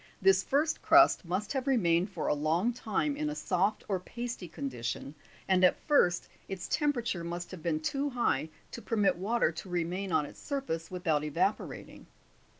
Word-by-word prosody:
This 190 0 +5
first 295 +9 0
crust 335 - +6
must 185 +7 -2
have 265 -1 -2
re 265 -2 +4
mained 170 -1 +2
for 175 -5 -4
a - - +2
long 160 +10 +1
time 245 +5 -1
in 300 +1 -2
a 300 - -4
soft 195 0 0
or 195 -3 0
pasty 235 0 -6
condition, 130 -2 -5 0.3
and 185 -1 +3
at 180 - +5
first 180 - +3 0.2
its 190 -2 -5
temperature 240 - 0
must 175 +1 -5
have 185 -3 -8
been 155 -1 0
too 280 - -1
high 235 - 0 0.2
to 235 - -7
permit 210 -2 +2
water 200 0 +1
to 165 +3 -8
remain 180 +2 -2
on 155 -2 +2
its - - -12
surface 215 - -3
without 165 -5 0
evaporating. 175 +7 -2
190 Hz, 175 wpm, -30 LUFS, 170-240 Hz, 0.3 s, crust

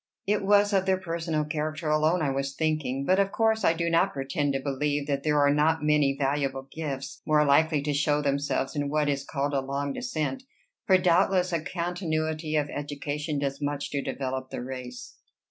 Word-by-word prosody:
"It 205 0 +1
was 205 +1 +4
of 190 -1 +2
their 190 0 +3
personal 165 -3 -2
character 155 +1 -3
alone 155 +3 +2
I 140 - +1
was 135 0 -2
thinking. 155 -4 -1
But 185 +4 +3
of 195 0 +2
course 220 -1 +1
I 165 - +4
do 170 0 -2
not 170 +4 +2
pretend 140 +1 -1
to 135 - 0
believe 145 +1 -1
that 140 -1 -1
there 150 0 +1
are 145 0 +4
not 155 +1 +2
many 150 -2 +3
valuable 135 -1 -1
gifts 140 -3 -5
more 150 -1 +3
likely 150 +1 +3
to 145 0 -1
show 145 +1 +2
themselves 140 -1 -1
in 145 -1 -1
what 150 0 +1
is 140 -1 -1
called 145 0 -2
a 135 - +1
long 140 +1 -3
descent; 240 - -3 0.5
for 190 - +6
doubtless 180 0 +2
a 165 - +1
continuity 160 -3 -2
of 150 -1 +1
education 145 +1 -4
does 140 0 -2
much 145 0 -2
to 140 - -1
develop 130 -1 -4
the - - -5
race." 125 -1 -8
150 Hz, 195 wpm, -27 LUFS, 140-165 Hz, 0.5 s, for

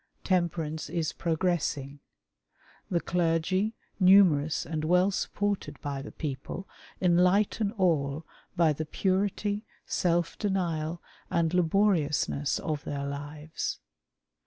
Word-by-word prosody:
Temperance 170 -4 -1
is 165 -1 -1
progressing. 160 -5 -1 0.9
The 170 -3 +1
clergy, 180 +5 +1 0.2
numerous 180 -6 +5
and 155 -1 -3
well 180 +4 +3
supported 200 -7 -2
by 140 -1 -4
the 135 - -8
people, 150 +5 -5 0.3
enlighten 185 +4 +3
all 160 - +1 0.3
by 165 -3 +4
the 155 +1 -4
purity, 205 +4 0 0.2
self 170 -1 0
denial, 170 -5 -1 0.3
and 165 0 +1
laboriousness 165 -6 +2
of 150 -2 -3
theii' 140 -1 -3
lives. 150 +2 -5
170 Hz, 100 wpm, -29 LUFS, 150-185 Hz, 0.9 s, numerous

